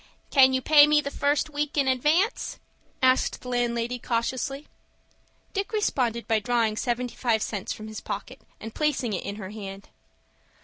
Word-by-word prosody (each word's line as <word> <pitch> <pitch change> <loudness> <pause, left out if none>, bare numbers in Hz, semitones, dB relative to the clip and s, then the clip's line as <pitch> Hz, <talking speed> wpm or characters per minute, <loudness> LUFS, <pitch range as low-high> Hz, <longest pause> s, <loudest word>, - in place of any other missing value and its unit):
"Can 265 -2 +6
you 260 0 0
pay 295 -1 +7
me 300 0 +4
the 280 -1 -3
first 290 +2 0
week 295 0 -3
in 275 -2 +3
advance?" 300 - +1 0.5
asked 260 0 +3
the 250 - -7
landlady, 240 0 -1
cautiously. 260 +5 -2 0.9
Dick 395 0 -2
responded 250 - 0
by 225 -1 +2
drawing 230 -1 +1
seventy 245 +2 -2
five 225 -3 +1
cents 200 -3 -4
from 215 - -6
his 215 0 -7
pocket, - - -6 0.2
and 225 - -8
placing 295 -7 0
it 185 - -2
in 200 - -5
her 195 -2 -7
hand. 200 -2 -8
250 Hz, 165 wpm, -26 LUFS, 225-290 Hz, 0.9 s, pay